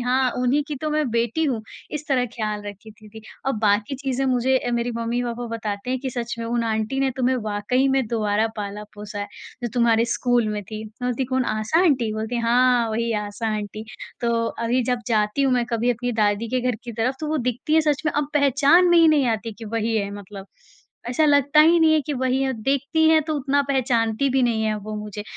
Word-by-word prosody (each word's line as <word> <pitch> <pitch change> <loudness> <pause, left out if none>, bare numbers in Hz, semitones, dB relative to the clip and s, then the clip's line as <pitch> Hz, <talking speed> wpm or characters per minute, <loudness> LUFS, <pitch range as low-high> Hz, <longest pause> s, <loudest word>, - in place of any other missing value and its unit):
हाँ, 255 +1 +1
उन्हीं 250 +4 +2
की 295 - -3
तो 310 - -1
मैं 300 -2 0
बेटी 235 +7 0
हूँ 250 -7 -1 0.3
इस 300 0 -5
तरह 255 -3 +2
ख़याल 215 -2 -3
रखी 205 +2 -9
थीं 215 0 -16
थीं 220 +1 -11 0.3
और 270 - +2
बाकी 205 +5 +1
चीज़ें 270 0 -2
मुझे 260 +1 +2
अ, 245 - -3
मेरी 235 0 0
मम्मी-पापा 240 +1 -2
बताते 210 +1 -4
हैं 260 - 0
कि 265 0 -3
सच 240 -1 -4
में 230 - -4
उन 235 0 -1
आंटी 220 +4 -1
ने 270 -1 +2
तुम्हें 260 0 +1 0.2
वाक़ई 250 +6 +1
में 265 -3 +1
दोबारा 215 -1 0
पाला-पोसा 210 0 -7
है। 205 - -3 0.4
जो 240 - -1
तुम्हारे 230 -2 +3
स्कूल 240 -1 +1
में 210 -1 -3
थीं, 215 +2 -7
मैं 225 +3 -5
बोलती 250 +2 -1
कौन? 260 0 0
आशा 215 +11 +1
आंटी 255 -10 +2
बोलती 220 +3 -3
है 235 - -2
हाँ, 245 0 +3
वही 230 +1 -1
आशा 210 +2 -4
आंटी। 210 +1 -6 0.4
तो 235 -1 +1
अभी 235 +2 -1
जब 250 +1 0
जाती 215 +3 +1
हूँ 270 - +2
मैं 245 -1 +2
कभी 235 0 0
अपनी 245 +1 -2
दादी 215 0 +1
के 255 +2 0
घर 250 0 0
की 240 - -6
तरफ 240 +4 0
तो 310 - -3
वो 310 - 0
दिखती 250 +5 -1
हैं 320 - +6
सच 300 -3 0
में 300 - +1
अब 290 -1 -1
पहचान 285 +5 +4
में 345 - +5
ही 330 -1 +6
नहीं 295 -4 +3
आती 225 0 -2
हैं 220 - -7
कि 230 - -8
वही 225 +1 -1
है 200 -2 -1
मतलब, 200 -1 -10 0.6
ऐसा 250 +6 +2
लगता 285 0 +4
ही 330 +3 +6
नहीं 320 -1 +5
है 310 - +4
कि 300 - -2
वही 260 0 0
हैं। 265 -1 0
देखती 280 +5 +2
है 320 0 +5
तो 310 - -1
उतना 285 +1 +1
पहचानती 240 -2 +1
भी 265 0 +2
नहीं 230 -2 +1
हैं 215 -1 0
वो 215 +1 -6
मुझे, 210 0 -6
240 Hz, 230 wpm, -23 LUFS, 220-270 Hz, 0.6 s, हैं